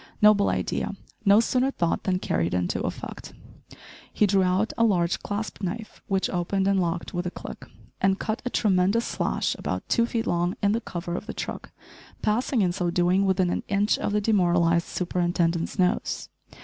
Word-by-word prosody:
Noble 210 -1 +5
idea! - - -2 0.3
No 200 +1 +7
sooner 255 +3 +2
thought 170 -10 -1
than 185 -1 +2
carried 85 - -1
into 90 -1 -1
effect. - - -6 0.8
He 210 - +3
drew 195 -1 +3
out 185 +4 +1
a 230 - +2
large 180 -6 +2
clasp 210 +1 -4
knife, 215 +4 -5
which 195 -1 +1
opened 190 +2 -1
and 195 -1 +3
locked 170 -1 -2
with 175 0 -2
a - - 0
click, - - -9 0.3
and 195 0 +3
cut 220 +2 -3
a 250 - -2
tremendous 200 +1 +2
slash - - -1
about - - -3
two 235 -1 +2
feet 230 -1 -2
long 175 -1 0
in 200 - +4
the 230 +2 0
cover 175 -4 -5
of 210 - -6
the - - -6
truck - - -5 0.5
passing, 225 +1 +1
in 180 - +2
so 175 0 -1
doing, 180 +3 +2
within 185 -2 +2
an - - -1
inch 200 +1 +1
of - - -1
the 210 0 +1
demoralised 175 -5 +2
superintendent's 175 -1 -1
nose. 185 +3 0
190 Hz, 180 wpm, -26 LUFS, 175-210 Hz, 0.8 s, No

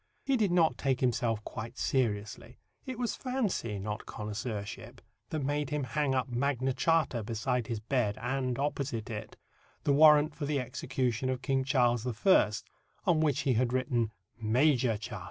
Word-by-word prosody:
He 275 - +2
did 210 -6 +2
not 170 -3 +3
take 135 -2 +1
himself 115 -3 0
quite 110 +2 -7
seriously. 110 -2 -1 0.3
It 260 -2 -4
was 240 -1 -1
fancy, 225 - -2
not 105 +2 -5
connoisseurship, 105 -1 -5 0.3
that 155 -3 -2
made 145 +1 -1
him 150 -1 -1
hang 140 0 0
up 130 -2 0
Magna 130 +1 0
Charta 160 -6 +1
beside 115 +2 -1
his 115 -2 -2
bed 110 -2 0
and, 125 +1 -1
opposite 135 -5 -2
it, 105 0 -6 0.5
the 140 - +3
warrant 150 +1 +6
for 145 - -4
the 145 -1 +1
execution 125 0 -2
of 130 0 -2
King 135 -1 +1
Charles 125 -3 +2
I., 120 - +4 0.5
on 165 -3 +3
which 150 -2 +2
he 135 - +2
had 120 +1 +1
written 125 -4 0 0.3
"Major 120 0 +3
Charta." 105 - -6
130 Hz, 160 wpm, -31 LUFS, 115-145 Hz, 0.5 s, warrant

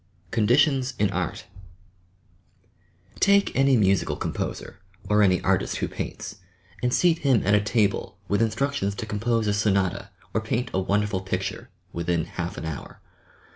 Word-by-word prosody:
"conditions" 125 +4 +2
in 105 -1 +1
art 90 -3 -3 1.7
Take 200 0 +4
any 135 -1 +4
musical 100 -3 +2
composer - - -4 0.3
or 105 +1 +3
any 95 -3 +4
artist - - +1
who - - -1
paints, - - -6 0.4
and 125 0 +1
seat 165 +4 +3
him 130 -6 +2
at 100 - +3
a 105 - +5
table 105 -1 0
with 100 +2 +1
instructions 115 -2 0
to 115 - -5
compose 110 +2 0
a 105 - +1
sonata 100 -2 0 0.2
or 110 - +1
paint 115 +3 -2
a 95 - +1
wonderful 100 0 0
picture, 95 - -4 0.2
within 85 -1 -1
half - - -5
an - - -5
hour! 80 -2 -7
105 Hz, 145 wpm, -25 LUFS, 100-125 Hz, 1.7 s, a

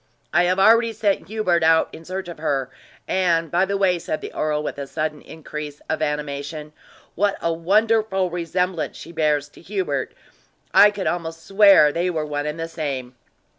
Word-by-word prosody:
I 175 +2 +4
have 185 +1 +1
already 230 +3 +5
sent 205 -2 0
Hubert 195 -5 +1
out 160 0 +4
in 165 - -11
search 185 +1 -5
of 170 -3 -9
her; 135 -4 -1 0.4
and, 170 -4 +1
by 180 +2 +3
the 200 +1 -1
way," 185 -3 +2
said 155 - -3
the - - -8
earl, 150 -1 -1
with 145 - -5
a 140 - -5
sudden 155 +1 -3
increase 150 -2 -8
of 160 - -1
animation, 150 0 -4 0.4
"what 200 +2 0
a 165 - 0
wonderful 195 +2 +1
resemblance 175 0 -2
she 165 - -10
bears 150 -3 +1
to - - -17
Hubert 175 -8 -3 0.6
I 210 - +8
could 205 -2 -5
almost 165 -1 -3
swear 195 -6 +6
they 175 +4 -1
were 160 -3 -2
one 145 0 -3
and 150 +2 -4
the 165 - -3
same!" 140 -6 -4
165 Hz, 180 wpm, -22 LUFS, 150-190 Hz, 0.6 s, I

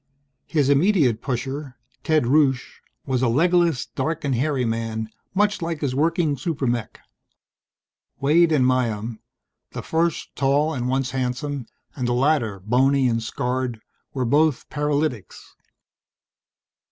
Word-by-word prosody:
His 150 -4 +1
immediate 140 - +3
pusher, 135 +1 -4 0.3
Ted 155 -2 +2
Rusche, 135 -1 +1 0.2
was 130 -2 0
a 130 - +3
legless, 170 +3 +2
dark 165 0 -3
and 140 - +1
hairy 130 +1 0
man, 115 -1 -3 0.2
much 205 0 +2
like 165 -2 -3
his 140 -4 -1
working 160 +1 +1
super 140 0 -2
mech. 120 -3 -2 1.2
Waide 160 +4 +4
and 140 -5 +3
Myham, 115 -3 0 0.5
the - - -5
first 165 0 -1
tall 145 +3 +2
and 125 -3 -2
once 130 0 0
handsome, 130 0 -3 0.3
and 125 -3 -2
the 120 - +1
latter, 125 -6 +1
bony 130 +5 +3
and 115 -1 0
scarred, 125 +1 -2 0.3
were 130 -2 -2
both 150 +2 +2
paralytics. 145 - -2
135 Hz, 130 wpm, -23 LUFS, 125-155 Hz, 1.2 s, Waide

